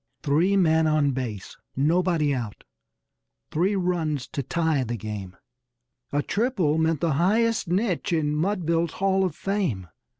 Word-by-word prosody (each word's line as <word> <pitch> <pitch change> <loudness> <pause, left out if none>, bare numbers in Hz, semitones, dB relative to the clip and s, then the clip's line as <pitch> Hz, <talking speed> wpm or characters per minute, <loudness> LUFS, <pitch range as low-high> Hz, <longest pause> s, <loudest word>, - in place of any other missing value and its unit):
Three 170 +7 +2
men 160 -3 +3
on 155 -2 +2
base 120 -7 -5 0.2
nobody 160 +1 +2
out 115 -6 -5 0.9
three 185 +6 +1
runs 165 -8 -1
to 140 - -3
tie 160 0 0
the 120 -1 -3
game! 100 -4 -7 0.7
A 145 0 0
triple 200 - 0
meant 160 -2 +1
the 165 -3 +1
highest 225 +4 +2
niche 185 +1 0
in 155 -3 +1
Mudville's 170 -1 0
hall 190 0 +1
of 180 -5 -1
fame. 175 - -2
160 Hz, 135 wpm, -25 LUFS, 140-185 Hz, 0.9 s, men